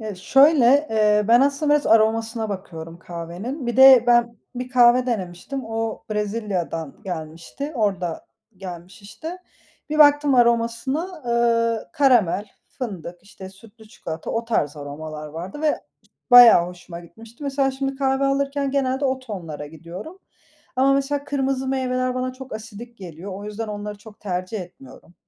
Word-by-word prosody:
E, 215 -2 -5
şöyle, 270 - +4 0.2
eee, 210 -1 +3
ben 235 +1 +6
aslında 280 +2 +2
biraz 295 - +1
aromasına 225 0 +2
bakıyorum 170 -4 -7
kahvenin. 180 - -7
Bir 240 - -2
de 265 -2 +8
ben 240 -1 +3 0.2
bir 250 +1 -5
kahve 250 0 +5
denemiştim. 220 +4 -4
O 225 0 -4
Brezilya'dan 205 -6 -3
gelmişti, 170 - -6
orada 195 -7 -2 0.3
gelmiş 185 +2 -10
işte. 320 - -8 0.5
Bir 305 - -1
baktım 290 -1 +5
aromasına, 245 +8 0
eee, 230 -1 +1
karamel, 225 -8 +3 0.2
fındık, 180 -7 -7
işte, 190 -1 -11
sütlü 215 +3 -17
çikolata, 160 -7 -7
o 230 +1 -2
tarz 155 -10 -1
aromalar 150 +1 -7
vardı 170 - -8
ve 305 -1 +1 0.5
bayağı 240 -8 +9
hoşuma 180 -1 -10
gitmişti. 225 - -14
Mesela 275 -1 0
şimdi 270 +1 -3
kahve 270 0 0
alırken 275 0 0
genelde 270 0 0
o 265 -1 0
tonlara 175 - -7
gidiyorum. 170 - -10 0.6
Ama 270 +2 +4
mesela 280 +1 -1
kırmızı 270 -2 -1
meyveler 255 -1 -1
bana 255 0 -2
çok 265 0 -10
asidik 225 +2 -10
geliyor, 180 +1 -9
o 200 +2 -8
yüzden 210 +1 -5
onları 210 0 -6
çok 210 0 -15
tercih 185 +1 -4
etmiyorum. 175 -2 -13
225 Hz, 140 wpm, -22 LUFS, 185-265 Hz, 0.6 s, bayağı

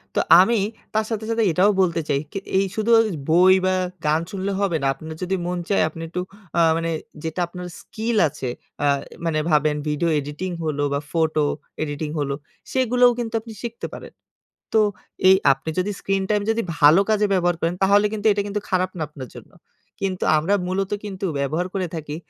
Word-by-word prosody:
তো - - +3 0.2
আমি 220 +5 +4 0.3
তার 215 0 +1
সাথে, 220 -1 -3
সাথে 230 0 +1
এটাও 185 +5 +4
বলতে 170 -2 +1
চাই 140 - +2
কি - - -5 0.2
এই 195 - +3
শুধু 220 0 -1
ওজ 225 - +3 0.2
বই 180 +3 +6
বা 185 - +2 0.3
গান 155 +2 +2
শুনলে 200 0 -2
হবে 195 -5 +1
না। 135 - +1
আপনার 160 +3 -9
যদি 190 +1 0
মন 180 0 -2
চায় 200 - +3
আপনি 165 +1 -10
একটু 180 +2 -3 0.4
আ - - +4 0.2
মানে 165 0 -2 0.3
যেটা 160 +2 -4
আপনার 180 +1 -8
স্কিল 225 +2 -3
আছে, 130 -3 -5 0.3
আ 145 - +3 0.4
মানে 160 -2 +1
ভাবেন 150 0 +3
ভিডিও 150 +3 0
এডিটিং 150 +6 -5
হলো 150 -2 -1
বা 140 - +1
ফটো 160 -2 +1 0.4
এডিটিং 150 0 -4
হলো, 140 -1 -1 0.4
সেগুলোও 250 -1 +4
কিন্তু 230 -1 -3
আপনি 225 0 -10
শিখতে 235 -1 -5
পারেন। - - -10 0.6
তো - - +6 0.5
এই 190 - +8 0.2
আপনি 160 - -7
যদি 190 +3 0
স্ক্রিন 195 0 0
টাইম 210 -1 +2
যদি 230 +1 0 0.2
ভালো 150 +6 +7
কাজে 210 -1 +3
ব্যবহার 175 -2 +2
করেন 165 +2 0
তাহলে 200 +2 +5
কিন্তু 215 0 0
এটা 205 - 0
কিন্তু 205 0 -3
খারাপ 185 0 +1
না 160 - -1
আপনার 130 -5 -9
জন্য। - - -12 0.5
কিন্তু 190 -2 -2
আমরা 165 +7 +1
মূলত 190 +1 -1
কিন্তু 195 -1 -5
ব্যবহার 155 +6 -1
করে 185 -2 -1
থাকি 150 -2 -5
185 Hz, 190 wpm, -22 LUFS, 155-205 Hz, 0.6 s, এই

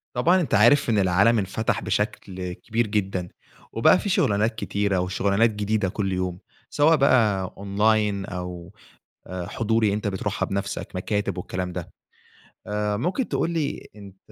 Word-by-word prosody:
طبعًا 175 +9 +3
أنت 155 - -3
عارف، 120 +7 +5
إن 110 - +2
العالم 100 +5 +3
انفتح 105 +3 -1
بشكل 90 -2 -3
كبير 115 +5 -2
جدًا. 95 -4 -2 0.4
وبقى 115 +11 +4
في 205 - -3
شُغلانات 110 - +1
كتيرة، 100 -3 -1
وشُغلانات 100 +4 +2
جديدة 105 -2 -1
كل 95 0 -2
يوم، 90 -1 -2 0.3
سواء 155 +3 +4
بقى 110 - +3
Online 100 0 +1
أو 90 -1 -6 0.6
آآ 90 -1 -5
حضوري، 110 0 +1
أنت 105 +1 -2
بتروحها 100 +1 -2
بنفسك، 100 0 -4
مكاتب 100 0 -2
والكلام 90 0 -4
ده. - - -7 0.7
آآ 105 0 -1
مُمكن 180 - -1
تقول - - 0
لي 160 -4 -3
أنت 100 -2 -13
105 Hz, 145 wpm, -24 LUFS, 95-115 Hz, 0.7 s, عارف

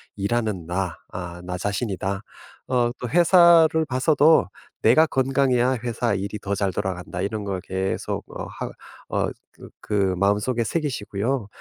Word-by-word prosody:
일하는 100 -4 -1
나 90 -1 -2 0.2
아 90 -1 -7
나 90 0 -4
자신이다. 100 -1 -2 0.5
어 120 -2 +1
또 125 - -4
회사를 170 -1 +6
봐서도 145 - +4 0.4
내가 155 +9 +6
건강해야 130 -2 +2
회사 120 -2 -1
일이 100 +2 -3
더 100 0 -3
잘 100 -1 0
돌아간다.' 90 -2 -4
이런 105 0 -3
걸 95 -2 -3
계속 95 0 -3 0.2
어 - - -4
하 - - -6 0.4
어 - - 0 0.3
그 - - -12
그 100 -3 0
마음속에 105 +5 +1
새기시고요. 120 -4 -2
105 Hz, 275 characters per minute, -23 LUFS, 95-130 Hz, 0.5 s, 회사를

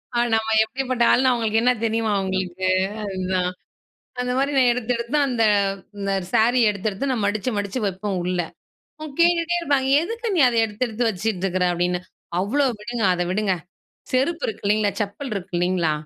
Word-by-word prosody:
அ - - +1 0.2
நம்ம 220 0 0 0.2
எப்படிப்பட்ட 255 +1 -1
ஆளுன்னு 260 0 +4
அவங்களுக்கு 225 -2 +1
என்ன 250 - +5
தெரியுமா 225 -1 0
அவங்களுக்கு. 190 -1 -2 0.4
அதுதான் 185 -2 -1 0.7
அந்த 250 0 -2
மாரி 275 +2 +1
நான் 255 -2 +5
எடுத்தெடுத்து 235 +2 -2
அந்த. 240 -3 +1 0.5
இந்த 200 -1 -1 0.2
சாரி 240 +3 +4
எடுத்தெடுத்து 205 +6 -3
நான் 220 -5 0
மடிச்சு 210 +5 -1
மடிச்சு 205 +4 -2
வெப்போம் 195 +1 -3
உள்ள. 180 0 -1 0.6
உ - - -4 0.2
கேட்டுகிட்டே 345 0 +3
இருப்பாங்க. 280 -5 +1
"எதுக்கு 460 +5 -4
நீ - - +3
அத 235 - -1
எடுத்து 225 +3 -2
எடுத்து 230 +1 0
வச்சிட்டுருக்கற?" 185 -2 -1
அப்படின்னு 175 +1 0 0.4
அவ்ளோ 270 +9 +1 0.2
விடுங்க. 235 +1 -4
அத 175 - 0
விடுங்க. 200 0 +1 0.6
செருப்பு 300 +7 +1
இருக்கு 220 - -5
இல்லங்களா? 210 0 +2
செப்பல் 215 +6 -4
இருக்கு 190 -1 -6
இல்லங்களா? 175 -3 +1
220 Hz, 155 wpm, -22 LUFS, 190-255 Hz, 0.7 s, என்ன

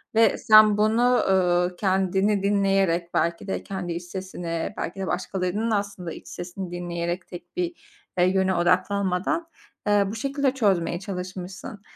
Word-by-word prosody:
Ve 225 +1 +4
sen 215 -1 +6
bunu, 235 +4 +3
uuu, 180 -1 +2
kendini 190 +1 +1
dinleyerek 195 -4 +1
belki 170 +4 0
de - - -3
kendi 185 -3 -4
iç 170 +1 -5
sesini 175 -2 -5
belki 185 +4 -4
de 190 - -3
başkalarının 190 +4 -1
da - - +3
aslında 200 -4 -3
iç - - -12
sesini 180 +1 -7
dinleyerek 175 0 -3
tek 175 - -11
bir, 355 -1 -1 0.4
eee, 180 - +5
yöne 190 0 +2
odaklanmadan, 185 - +1 0.4
ııı, 205 -1 +3
bu - - -5
şekilde 275 +3 0
çözmeye 190 -9 +1
çalışmışsın. 185 +1 -7
190 Hz, 145 wpm, -25 LUFS, 175-205 Hz, 0.4 s, sen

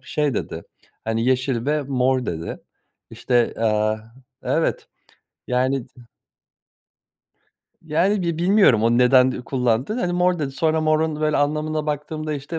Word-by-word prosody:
şey 150 -4 -1
dedi, 85 -4 -4 0.4
hani, 115 +1 -1
"Yeşil 130 -1 0
ve 150 0 +1
mor. 130 -1 0
dedi. 80 0 -5 0.5
İşte, 120 -2 0
aaa 110 -1 +1 0.4
Evet, - - -1 0.6
yani 130 +1 0
da 125 - -19 1.8
Yani, 175 +6 +1
bi 170 -2 -2
bilmiyorum 175 - +4
o 115 - +3
neden 130 +1 +5
ü 125 - -6
kullandığını. 125 - -1
Hani, 175 -4 -1
"Mor." 180 0 +1
dedi. 145 -3 -2
Sonra 160 +2 +1
morun, 155 0 0
böyle, 155 -1 +1
anlamında 155 +1 -1
baktığımda, 155 +1 -3
işte, 145 +4 -5
140 Hz, 135 wpm, -22 LUFS, 125-155 Hz, 1.8 s, neden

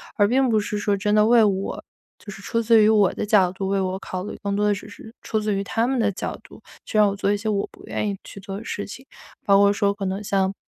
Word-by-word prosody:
而 205 -2 +3
并 255 +3 +2
不 220 -1 +3
是 205 0 -3
说 205 -1 +1
真 210 +1 0
的 210 0 +5
为 235 -1 +6
我 195 -2 -1 0.4
就 205 - -10
是 195 - -11
出 230 +3 -1
自 225 -1 +5
于 210 - +5
我 210 -4 +4
的 - - -4
角 200 -4 +3
度 190 +1 -4
为 195 0 0
我 190 0 -2
考 185 -1 -5
虑， 210 - -7
更 200 0 -2
多 210 - +1
的 205 - +3
只 200 +1 -8
是 220 +1 -13
出 220 - -2
自 210 -1 -1
于 195 0 -1
他 225 +3 0
们 265 -2 0
的 210 -2 +2
角 - - -5
度， - - -16 0.2
去 215 - -3
让 210 -1 +6
我 195 - -3
做 200 0 0
一 205 - +1
些 220 +2 -6
我 200 -1 -1
不 - - -17
愿 210 - -2
意 200 - -4
去 - - -11
做 195 0 -7
的 215 - -8
事 205 -2 -4
情。 260 +6 -10 0.4
包 200 -1 +5
括 200 0 +5
说 200 0 +1
可 200 -1 -5
能 190 +2 -3
像， 195 -2 0
205 Hz, 315 characters per minute, -23 LUFS, 195-215 Hz, 0.4 s, 为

